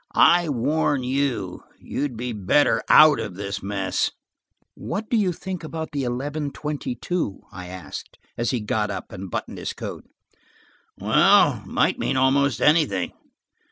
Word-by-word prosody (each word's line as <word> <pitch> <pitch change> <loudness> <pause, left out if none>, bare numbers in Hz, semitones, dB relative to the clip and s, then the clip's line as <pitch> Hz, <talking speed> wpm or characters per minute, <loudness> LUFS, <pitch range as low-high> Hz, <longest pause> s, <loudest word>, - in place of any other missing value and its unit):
I 175 -2 +5
warn 145 +1 +1
you–you'd 130 0 -3
be 120 +1 -3
better 105 +8 +2
out 155 -1 +8
of 90 - -5
this 100 +1 -4
mess." 100 -1 -1 0.6
"What 215 +2 -5
do - - +3
you 200 -5 +2
think 185 0 -6
about 160 0 -5
the 140 -3 -2
eleven 140 +4 -3
twenty 145 -3 -4
two?" 120 - -3
I 90 -1 -8
asked 90 -4 -8 0.2
as 120 -1 -1
he 125 -4 -1
got 105 0 -1
up 100 - -6
and 95 0 -7
buttoned - - -5
his - - -4
coat. - - -7 0.9
"Well, - - +4
it - - -15
might - - +1
mean 135 - 0
almost 135 -1 +2
anything. 150 - +3
130 Hz, 150 wpm, -23 LUFS, 105-150 Hz, 0.9 s, out